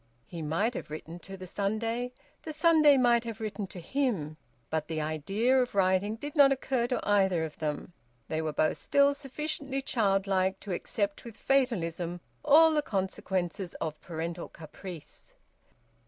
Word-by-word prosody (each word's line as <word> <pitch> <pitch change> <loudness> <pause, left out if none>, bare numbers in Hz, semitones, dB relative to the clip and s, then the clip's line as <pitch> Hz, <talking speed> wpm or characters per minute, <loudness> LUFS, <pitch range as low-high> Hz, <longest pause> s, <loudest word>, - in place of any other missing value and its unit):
He 170 -2 -7
might 165 +10 0
have - - -6
written 160 +3 -7
to 195 +2 -9
the 185 - -8
Sunday; 225 +6 -2 0.3
the 315 - -6
Sunday 310 -2 +6
might 240 -2 +4
have 230 -1 -6
written 215 -2 -4
to 185 - -9
him: 180 - -1 0.4
but 160 -1 -1
the 160 -1 -2
idea 195 - +1
of 245 -4 -3
writing 195 +2 +2
did 290 +6 -7
not 280 -2 +7
occur 260 -2 0
to 250 - -2
either 190 -5 +3
of 155 - -9
them; 150 +2 -3 0.3
they 155 0 -1
were 155 -1 -1
both 155 +1 +1
still 280 0 +4
sufficiently 280 0 -3
childlike 195 -6 +1
to 200 - -4
accept 200 +3 -2
with 230 -3 -10
fatalism 180 -10 0 0.2
all 315 +2 +7
the 300 - +3
consequences 190 - -2
of 155 -1 -4
parental 170 0 -5
caprice. 165 +1 -10
200 Hz, 155 wpm, -29 LUFS, 170-255 Hz, 0.4 s, not